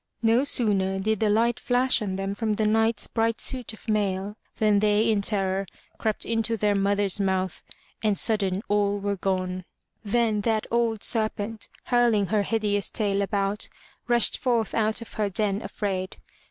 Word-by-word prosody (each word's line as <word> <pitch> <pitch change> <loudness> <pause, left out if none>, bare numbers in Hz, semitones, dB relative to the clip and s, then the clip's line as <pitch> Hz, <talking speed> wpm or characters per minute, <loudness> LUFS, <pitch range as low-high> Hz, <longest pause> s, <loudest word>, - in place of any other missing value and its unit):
No 230 +3 +4
sooner 200 -8 +1
did 215 +2 0
the 215 - +2
light 230 +3 +2
flash 250 0 +2
on 195 -3 -2
them 195 +1 -2
from 215 +1 -1
the 215 - 0
Knight's 225 +1 +2
bright 230 0 0
suit 255 -4 -1
of 220 - -15
mail 205 -1 -1 0.2
than 210 -2 +3
they 210 +1 +3
in 210 -2 +1
terror 195 -1 -1 0.3
crept 220 -2 -1
into 225 0 0
their 210 0 +2
mother's 200 0 +1
mouth 190 -2 -1 0.4
and 210 -2 +2
sudden 200 -3 0
all 205 0 +1
were 200 0 -1
gone. 185 -1 -2 0.4
Then 220 0 +1
that 220 0 0
old 230 -2 +1
serpent, 215 -1 -1
hurling 240 -4 +3
her 210 - +3
hideous 205 -3 0
tail 200 -2 0
about, 200 +1 -1 0.4
rushed 240 -2 +3
forth 235 -4 0
out 220 +1 0
of - - -14
her 210 -2 -1
den 200 +1 -1
afraid. 195 -2 -3
210 Hz, 165 wpm, -25 LUFS, 200-225 Hz, 0.4 s, No